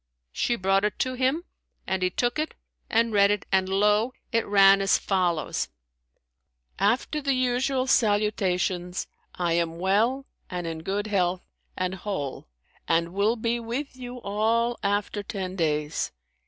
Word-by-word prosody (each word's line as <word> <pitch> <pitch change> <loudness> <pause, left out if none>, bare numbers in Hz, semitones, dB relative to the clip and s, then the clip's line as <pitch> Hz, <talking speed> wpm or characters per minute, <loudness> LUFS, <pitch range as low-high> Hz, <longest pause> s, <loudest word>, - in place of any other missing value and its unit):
She 240 - 0
brought 195 -1 +2
it 210 - 0
to 255 -1 -1
him, 260 +6 0 0.4
and 190 0 -1
he 185 - +2
took 240 +9 -1
it 310 - -2 0.3
and 230 -1 +2
read 200 -1 +5
it; 205 -1 0
and 190 -1 +2
lo! 210 +5 +2 0.2
it 230 -2 +1
ran 195 -1 +6
as 195 - +4
follows, 175 -6 0 1.1
"After 240 +9 +1
the 275 -1 +1
usual 255 +1 +1
salutations, 195 -6 +1 0.3
I 175 -2 0
am 165 -1 0
well 220 +9 +1 0.2
and 180 -1 -4
in 165 -1 -4
good 200 +5 -2
health 185 -3 0 0.3
and 185 0 -1
whole 185 - -4 0.4
and 170 +1 +1
will 205 +4 +2
be 235 +1 -1
with 245 +5 -4
you 250 -1 -8
all 230 +4 +1
after 205 0 -1
ten 190 -2 -5
days. 150 -3 -1
205 Hz, 145 wpm, -26 LUFS, 185-235 Hz, 1.1 s, ran